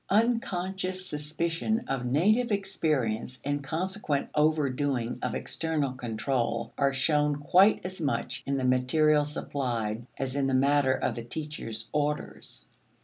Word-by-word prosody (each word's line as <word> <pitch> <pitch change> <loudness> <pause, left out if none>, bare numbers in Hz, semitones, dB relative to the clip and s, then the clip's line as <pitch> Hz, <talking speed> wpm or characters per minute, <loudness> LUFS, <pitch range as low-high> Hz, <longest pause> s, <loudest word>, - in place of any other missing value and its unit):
Unconscious 190 -4 0
suspicion 165 +8 -1
of 125 -2 -2
native 215 - +3
experience 150 - 0
and 145 0 -1
consequent 165 -2 -2
overdoing 145 -5 +1
of - - -2
external 155 -5 -2
control 120 -1 -2
are 140 -1 +2
shown 150 +2 +2
quite 185 +8 +5
as 180 0 -4
much 130 -6 -1
in 140 0 +1
the 130 - -1
material 145 +4 +3
supplied 120 -6 -2
as 135 0 -2
in 140 -1 +1
the 135 - +1
matter 135 0 +3
of - - -1
the 120 - -6
teacher's 115 -5 -5
orders. 150 0 -3
145 Hz, 130 wpm, -28 LUFS, 130-165 Hz, -, quite